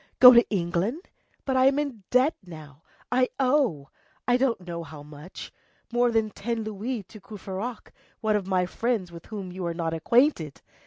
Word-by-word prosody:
Go 250 0 +11
to 235 0 +5
England? 195 - -1 0.4
But 265 - 0
I 260 +1 +5
am 275 +1 +3
in 280 -7 -2
debt 255 +5 +3
now, 155 -5 -12 0.3
I 255 +1 +3
owe, 255 - +1 0.4
I 245 - +4
don't 250 -5 +1
know 170 -1 -5
how 150 -2 -10
much, 150 +4 -10 0.4
more 245 0 +3
than 220 -2 +1
ten 230 +2 -3
louis 215 +2 -4
to 205 +3 -14
Courfeyrac, 205 +3 -7 0.3
one 215 -1 +1
of 200 -3 -1
my 185 -2 +2
friends 215 -2 -2
with 170 -1 -11
whom 200 -4 -6
you 185 +1 -6
are 170 - -3
not 165 -1 -2
acquainted! 170 - +1
210 Hz, 175 wpm, -26 LUFS, 175-245 Hz, 0.4 s, Go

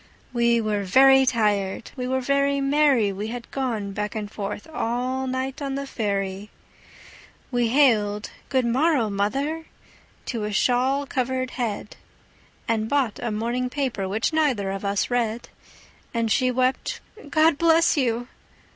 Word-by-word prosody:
We 235 -1 +3
were 215 -2 -1
very 265 +6 +6
tired, 210 -3 0
we 250 -2 -3
were 260 +1 0
very 280 +1 +1
merry, 275 -6 +3
We 205 +3 -4
had 240 +1 -7
gone 230 -7 -2
back 210 +2 -4
and 210 -1 -4
forth 205 -1 -5
all 255 +2 -1
night 260 +3 -3
on 275 -1 -2
the 280 0 -3
ferry, 200 -4 -3 1.0
We 245 -2 +1
hailed 220 -6 +2 0.2
"Good 260 -3 +1
morrow, 255 -2 +2
mother!" 275 +11 -1 0.6
to 230 -4 -3
a 210 - -3
shawl 255 +6 +2
covered 255 -1 -2
head, 215 -4 -4 0.7
And 220 -1 0
bought 270 -6 0
a 240 - -2
morning 235 +4 -1
paper, 250 -9 -2
which 220 +10 -1
neither 260 -11 +1
of 195 0 -5
us 200 +3 -1
read; 235 -1 -1 0.7
And 230 -1 0
she 255 +4 +3
wept, 255 +1 0 0.3
"God 310 -1 +3
bless 330 0 +4
you!" 245 -4 0
245 Hz, 145 wpm, -24 LUFS, 210-270 Hz, 1.0 s, very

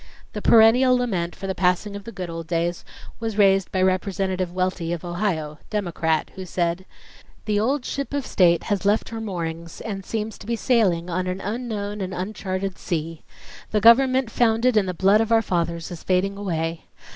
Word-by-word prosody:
The - - -4
perennial 245 +3 +6
lament 185 -9 -2
for - - -8
the 190 - -1
passing 185 +3 0
of 200 0 -8
the 230 - -7
good 185 -5 -5
old 165 -1 -6
days 170 0 -1 0.4
was 225 -2 -3
raised 195 -2 +4
by 185 -1 +1
Representative 185 -1 0
Welty 185 -2 -1
of 175 0 -5
Ohio, 175 -5 -2
Democrat, 170 -6 -1
who 190 - -7
said: 175 0 -2 0.6
"The 210 -1 +1
old 255 +5 0
ship 280 0 -3
of 285 -3 -2
state 170 -3 +3
has 205 -3 -1
left 205 +2 +1
her 225 -1 -5
moorings 170 -5 -5
and 195 -3 -5
seems 220 +1 -4
to - - -12
be 235 - 0
sailing 205 -9 +2
on 185 +2 -1
an 185 +1 -3
unknown 210 -1 -4
and 185 -1 -4
uncharted 190 0 -4
sea. 165 -1 -3 0.5
The 215 - +1
government 255 +2 +5
founded 230 +1 +2
in 205 -3 +3
the 180 - -3
blood 195 +5 +4
of 225 0 -2
our 225 0 +4
fathers 170 -3 -2
is 170 - -7
fading 190 +2 0
away. 165 -4 -3
190 Hz, 185 wpm, -23 LUFS, 175-220 Hz, 0.6 s, perennial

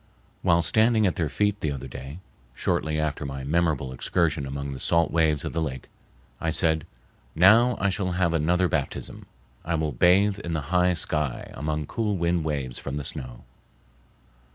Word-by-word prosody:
While 85 -2 +3
standing 110 +3 +3
at 90 - +2
their 80 -4 -1
feet, 105 +5 0
the 75 - 0
other 70 -3 -5
day, 65 +4 -8 0.4
shortly 75 +4 -1
after 75 0 -2
my 70 -1 -5
memorable 75 -3 0
excursion 75 +1 0
among 70 +1 -4
the 65 - -6
salt 85 +3 +2
waves 80 -3 +2
of - - -4
the 80 - -1
lake, 65 -5 -4 0.5
I 80 - -1
said: 80 -2 +1 0.5
"Now 110 +8 +6
I 100 0 +2
shall 90 -1 -2
have 90 -2 +1
another 85 +3 +2
baptism. 75 -5 -3 0.4
I 85 +1 -1
will 80 -1 -1
bathe 95 +9 +3
in 85 -4 -4
the 80 +1 -4
high 90 0 +4
sky, 75 -5 -2
among 75 +1 -3
cool 105 +3 -1
wind 85 -1 +1
waves 70 -5 -3
from 70 0 -5
the 70 - -5
snow." 65 -2 -7
80 Hz, 175 wpm, -25 LUFS, 70-90 Hz, 0.5 s, Now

